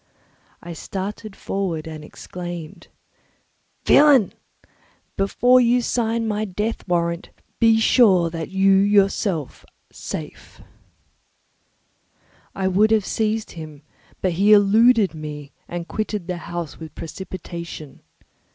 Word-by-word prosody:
I 170 Hz, -, -7 dB
started 195 Hz, +4 st, -6 dB
forward 180 Hz, -5 st, -3 dB
and 155 Hz, -1 st, -8 dB
exclaimed, 175 Hz, 0 st, -8 dB, 1.0 s
"Villain! 280 Hz, -8 st, +5 dB, 0.8 s
Before 245 Hz, +6 st, +3 dB
you 245 Hz, 0 st, +3 dB
sign 230 Hz, -1 st, -1 dB
my 210 Hz, 0 st, -1 dB
death 210 Hz, +3 st, -4 dB
warrant, 170 Hz, -1 st, -1 dB, 0.3 s
be 225 Hz, -1 st, +5 dB
sure 190 Hz, -8 st, +4 dB
that 165 Hz, -2 st, -5 dB
you 195 Hz, 0 st, +4 dB
are -, -, +3 dB
yourself 195 Hz, -, +1 dB, 0.3 s
safe." -, -, -8 dB, 2.0 s
I 190 Hz, -1 st, -1 dB
would 200 Hz, +4 st, +3 dB
have 220 Hz, -3 st, +2 dB
seized 220 Hz, 0 st, -1 dB
him, 155 Hz, -3 st, -10 dB, 0.4 s
but 185 Hz, -, +1 dB
he 200 Hz, +5 st, +4 dB
eluded 210 Hz, -1 st, +5 dB
me 150 Hz, -2 st, -8 dB, 0.2 s
and 175 Hz, -1 st, -6 dB
quitted 215 Hz, -3 st, -3 dB
the 180 Hz, 0 st, -4 dB
house 170 Hz, -2 st, -6 dB
with 160 Hz, -2 st, -10 dB
precipitation. 170 Hz, -4 st, -8 dB
190 Hz, 110 wpm, -22 LUFS, 170-215 Hz, 2.0 s, Villain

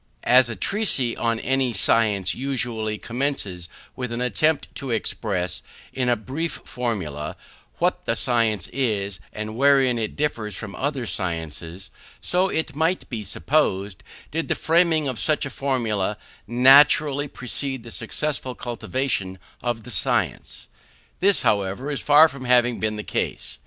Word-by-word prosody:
As 125 Hz, 0 st, +5 dB
a 115 Hz, -, -4 dB
treatise 135 Hz, -, 0 dB
on 115 Hz, -1 st, +1 dB
any 130 Hz, -2 st, +1 dB
science 100 Hz, -6 st, +3 dB
usually 120 Hz, -4 st, -2 dB
commences 115 Hz, -9 st, -3 dB, 0.3 s
with 125 Hz, -2 st, -4 dB
an 120 Hz, -, -3 dB
attempt 130 Hz, +6 st, +1 dB
to 140 Hz, -1 st, -6 dB
express, 90 Hz, -6 st, -2 dB, 0.3 s
in 125 Hz, -2 st, 0 dB
a 120 Hz, -, +4 dB
brief 140 Hz, +10 st, -4 dB
formula, 90 Hz, -, -4 dB, 0.4 s
what -, -, 0 dB
the 115 Hz, -, 0 dB
science 115 Hz, -6 st, +1 dB
is, 105 Hz, -7 st, -1 dB
and 110 Hz, 0 st, -5 dB
wherein 135 Hz, -2 st, +4 dB
it 110 Hz, -, -3 dB
differs 115 Hz, -9 st, -2 dB
from 100 Hz, +1 st, -7 dB
other 135 Hz, -3 st, -2 dB
sciences, 85 Hz, -1 st, -4 dB, 0.3 s
so, 185 Hz, +2 st, +1 dB
it 160 Hz, -4 st, -2 dB
might 165 Hz, +4 st, 0 dB
be 110 Hz, -3 st, -3 dB
supposed, 100 Hz, -, 0 dB, 0.3 s
did 165 Hz, +2 st, -2 dB
the -, -, +1 dB
framing 165 Hz, -2 st, +3 dB
of 130 Hz, -4 st, -3 dB
such 155 Hz, -2 st, +1 dB
a 140 Hz, -, -5 dB
formula 115 Hz, -7 st, -1 dB, 0.3 s
naturally 140 Hz, +3 st, +5 dB
precede 130 Hz, -1 st, -4 dB
the 115 Hz, -, -10 dB
successful 130 Hz, +2 st, -3 dB
cultivation 120 Hz, -5 st, -2 dB, 0.2 s
of 120 Hz, -2 st, -2 dB
the 125 Hz, -, -9 dB
science. -, -, -1 dB, 0.5 s
This, 200 Hz, +1 st, +3 dB
however, 100 Hz, +7 st, 0 dB
is 140 Hz, -, -2 dB
far 150 Hz, +2 st, +7 dB
from 140 Hz, -4 st, -9 dB
having 125 Hz, -1 st, +3 dB
been 110 Hz, 0 st, -1 dB
the 105 Hz, -, -5 dB
case. -, -, -3 dB
120 Hz, 145 wpm, -23 LUFS, 105-140 Hz, 0.5 s, far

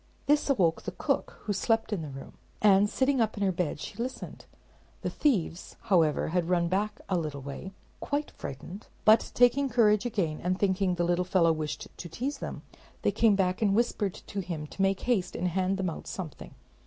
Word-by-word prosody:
This 295 Hz, 0 st, +2 dB
awoke 180 Hz, -11 st, +2 dB
the -, -, -6 dB
cook, -, -, -1 dB
who 205 Hz, -, -1 dB
slept 225 Hz, +2 st, +1 dB
in 190 Hz, -, -1 dB
the 155 Hz, -, -6 dB
room, 135 Hz, 0 st, -9 dB, 0.3 s
and 205 Hz, 0 st, +5 dB
sitting 265 Hz, +1 st, +2 dB
up 220 Hz, -1 st, 0 dB
in 205 Hz, -, -1 dB
her 195 Hz, -, +3 dB
bed 175 Hz, -5 st, -2 dB
she -, -, -8 dB
listened. 255 Hz, +2 st, -6 dB, 0.6 s
The -, -, -1 dB
thieves, 190 Hz, -, 0 dB
however, 170 Hz, -10 st, +2 dB
had 175 Hz, 0 st, 0 dB
run 170 Hz, -2 st, +2 dB
back 205 Hz, +3 st, -1 dB
a 190 Hz, -, 0 dB
little 150 Hz, -5 st, -3 dB
way, 145 Hz, +8 st, -7 dB, 0.3 s
quite 290 Hz, +1 st, -2 dB
frightened; 175 Hz, +9 st, -8 dB, 0.2 s
but 220 Hz, +1 st, +6 dB
taking 255 Hz, +3 st, +4 dB
courage 215 Hz, -2 st, +3 dB
again, 170 Hz, -9 st, -1 dB
and 180 Hz, +1 st, 0 dB
thinking 190 Hz, -2 st, +1 dB
the 175 Hz, -, 0 dB
little 175 Hz, +1 st, +2 dB
fellow 175 Hz, -2 st, +3 dB
wished 155 Hz, -2 st, -3 dB
to 170 Hz, -, -7 dB
tease 265 Hz, -, -3 dB
them, -, -, -6 dB, 0.4 s
they -, -, +3 dB
came 220 Hz, -3 st, +4 dB
and 195 Hz, +2 st, +2 dB
whispered 215 Hz, -4 st, 0 dB
to 200 Hz, -, -7 dB
him 170 Hz, -5 st, -4 dB
to 170 Hz, -, -7 dB
make 195 Hz, 0 st, +2 dB
haste 200 Hz, -7 st, 0 dB
and 180 Hz, -, 0 dB
hand 190 Hz, +2 st, 0 dB
them 185 Hz, -3 st, -1 dB
out -, -, -9 dB
something. 175 Hz, -6 st, -7 dB
190 Hz, 195 wpm, -29 LUFS, 170-220 Hz, 0.6 s, but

